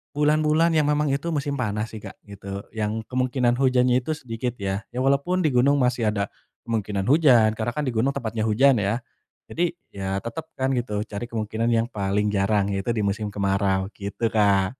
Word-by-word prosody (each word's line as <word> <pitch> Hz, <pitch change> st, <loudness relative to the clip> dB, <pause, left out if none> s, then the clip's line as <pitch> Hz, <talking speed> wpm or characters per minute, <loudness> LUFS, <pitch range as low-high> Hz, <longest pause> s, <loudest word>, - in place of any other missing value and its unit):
bulan-bulan 155 Hz, +2 st, +3 dB
yang 150 Hz, -1 st, +3 dB
memang 150 Hz, -1 st, +1 dB
itu 145 Hz, +5 st, -2 dB
musim 145 Hz, 0 st, -1 dB
panas 105 Hz, 0 st, -1 dB
sih, 110 Hz, -, -7 dB
Kak, -, -, -9 dB
gitu, 100 Hz, -1 st, -8 dB
yang 110 Hz, 0 st, -2 dB
kemungkinan 125 Hz, -1 st, +1 dB
hujannya 125 Hz, -1 st, +3 dB
itu 155 Hz, -, -4 dB
sedikit, 120 Hz, -2 st, -4 dB
ya. 100 Hz, 0 st, -2 dB
Ya -, -, -7 dB
walaupun 160 Hz, +6 st, +1 dB
di -, -, +4 dB
gunung 140 Hz, +4 st, +4 dB
masih 125 Hz, -3 st, +2 dB
ada 100 Hz, -1 st, -2 dB, 0.4 s
kemungkinan 105 Hz, -4 st, -2 dB
hujan, 130 Hz, -9 st, +6 dB
karena 110 Hz, +1 st, -1 dB
kan 150 Hz, -1 st, -1 dB
di 125 Hz, -, -1 dB
gunung 115 Hz, +5 st, +2 dB
tempatnya 110 Hz, -1 st, -2 dB
hujan, 130 Hz, +3 st, +4 dB
ya. 100 Hz, +4 st, 0 dB, 0.5 s
Jadi, 170 Hz, +1 st, -1 dB, 0.2 s
ya 95 Hz, 0 st, -3 dB
tetep 115 Hz, +8 st, -6 dB
kan 130 Hz, -, +1 dB
gitu, 105 Hz, -4 st, -2 dB
cari 105 Hz, +3 st, -5 dB
kemungkinan 110 Hz, +1 st, -2 dB
yang 115 Hz, 0 st, +2 dB
paling 105 Hz, -1 st, -1 dB
jarang 100 Hz, 0 st, +1 dB
yaitu 95 Hz, +4 st, -2 dB
di 110 Hz, -, 0 dB
musim 105 Hz, +1 st, -1 dB
kemarau, 95 Hz, -1 st, +1 dB
gitu, 100 Hz, +3 st, -4 dB
Kak. 100 Hz, -1 st, +3 dB
115 Hz, 185 wpm, -24 LUFS, 100-135 Hz, 0.5 s, hujan